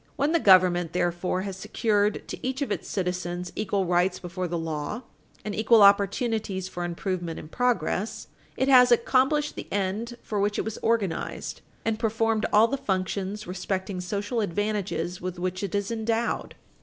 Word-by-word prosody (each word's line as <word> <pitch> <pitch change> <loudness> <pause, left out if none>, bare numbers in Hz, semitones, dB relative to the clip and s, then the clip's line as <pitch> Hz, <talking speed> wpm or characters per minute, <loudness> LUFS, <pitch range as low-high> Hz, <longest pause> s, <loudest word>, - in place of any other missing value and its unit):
When 285 +2 +1
the 335 - +3
government, 180 - +5
therefore, 180 +1 0
has 195 -1 -4
secured 210 +1 0
to - - -6
each 265 +2 -1
of - - -5
its - - -3
citizens 180 -1 -3
equal 200 -2 0
rights 180 +1 +2
before 180 +1 -4
the 170 0 -2
law 160 - -4 0.4
and 210 - -3
equal 220 0 +5
opportunities 200 -1 +2
for 175 -1 -5
improvement 175 -1 -3
and 155 - -9
progress, 225 -4 -1 0.3
it 260 - +1
has 250 -2 +7
accomplished 265 +5 +3
the - - -8
end 205 +5 -2
for 210 - -2
which 205 +1 +1
it - - -1
was 220 -1 -4
organized, 225 -6 -1 0.2
and 225 -1 0
performed 225 -1 +1
all 210 +2 +6
of 230 - -3
the 275 - 0
functions 195 0 -2
respecting 185 +1 -3
social 205 +5 -2
advantages 205 -2 -2
with 180 0 -4
which 185 +1 -3
it 200 -1 -3
is 200 +1 -1
endowed." 230 +1 -1
200 Hz, 170 wpm, -26 LUFS, 180-225 Hz, 0.4 s, has